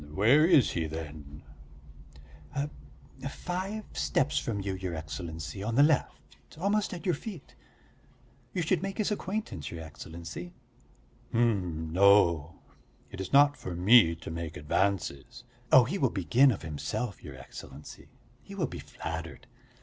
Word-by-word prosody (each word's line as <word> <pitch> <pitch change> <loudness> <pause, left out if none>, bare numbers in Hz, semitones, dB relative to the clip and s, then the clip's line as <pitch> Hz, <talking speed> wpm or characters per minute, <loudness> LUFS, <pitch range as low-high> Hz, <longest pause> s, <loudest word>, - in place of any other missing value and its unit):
"Hm, 75 +1 -13
where 135 +11 +5
is 145 -8 +5
he, 80 -2 -1
then?" 75 -2 -8 1.9
"Five 190 +7 -4
steps 145 +1 +1
from 115 -7 -3
you, 95 -1 -2
your 95 -2 -4
Excellency, 80 +2 -6
on 115 +3 -2
the 140 - +7
left.... 150 0 -1
Almost 200 +4 +1
at 175 - -9
your 180 - +2
feet. 170 -1 -8 1.0
You 175 - -1
should 170 +2 +1
make 195 0 -4
his 215 -1 0
acquaintance, 195 - -3
your 85 - -7
Excellency." 85 +2 -8 0.8
"Hm, 90 -9 0
no 85 -5 +4 0.5
it's 95 -1 -6
not 145 +1 +6
for 90 - -6
me 90 -1 +6
to 80 0 -8
make 80 -1 -5
advances." 100 - -1 0.3
"Oh, 130 - +9
he 170 +12 -3
will 135 - +3
begin 115 +9 +4
of 110 - -2
himself, 100 +8 -4
your 75 -5 -9
Excellency. 70 +2 -11 0.3
He - - -11
will - - 0
be - - -7
flattered. - - -7
100 Hz, 140 wpm, -29 LUFS, -, 1.9 s, Oh